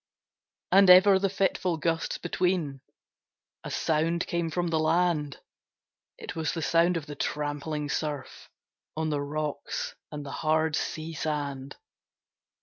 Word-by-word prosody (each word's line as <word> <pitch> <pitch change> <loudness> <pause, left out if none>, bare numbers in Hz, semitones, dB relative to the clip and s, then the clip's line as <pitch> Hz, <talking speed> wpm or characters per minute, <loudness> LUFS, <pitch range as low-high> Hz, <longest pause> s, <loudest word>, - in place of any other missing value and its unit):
And 195 -1 +7
ever 190 +2 +8
the 195 0 +1
fitful 185 -3 0
gusts 165 +1 -1
between 175 -6 -1 0.8
A - - -6
sound 165 +2 0
came 170 -1 -1
from 175 +1 -1
the 160 -1 +1
land; 155 -3 +1 0.8
It - - -7
was 155 -4 -1
the 165 - -3
sound 170 +1 +3
of 160 - -5
the 150 - -7
trampling 150 +1 -3
surf, 145 -2 -4 0.5
On 160 -1 -1
the 145 -1 0
rocks 150 0 -3 0.2
and 150 -1 -6
the 135 - -6
hard 155 0 +2
sea 160 +2 -3
sand. 140 -3 -3
160 Hz, 135 wpm, -28 LUFS, 150-170 Hz, 0.8 s, ever